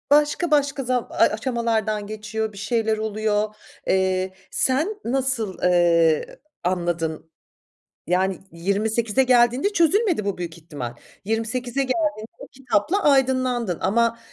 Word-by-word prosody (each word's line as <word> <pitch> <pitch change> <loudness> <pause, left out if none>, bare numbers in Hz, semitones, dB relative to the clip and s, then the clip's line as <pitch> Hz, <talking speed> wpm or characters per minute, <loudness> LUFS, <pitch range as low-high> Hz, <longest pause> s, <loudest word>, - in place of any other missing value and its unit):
Başka 295 +3 +3
başka 285 -2 +2
za 250 -1 -1
ay, - - +3
aşamalardan 220 -3 -1
geçiyor 215 0 -4
bir - - -13
şeyler 220 +1 0
oluyor. 215 0 -1 0.3
Eee, 190 0 +1 0.2
sen 315 +11 0
nasıl, 250 -6 -1
eee, 170 -3 +3 0.2
anladın? 170 -3 -2 0.8
Yani 185 +1 +1
28'e 210 +7 0
geldiğinde 250 - +3
çözülmedi 360 - +2
bu 200 -2 -2
büyük 170 -1 -6
ihtimal. 145 -7 -7 0.3
28'e 230 +4 -2
geldiğinde 270 -5 -1
o - - -10
kitapla 270 - 0
aydınlandın 255 - +2
ama 230 +4 +1
220 Hz, 115 wpm, -23 LUFS, 190-260 Hz, 0.8 s, Başka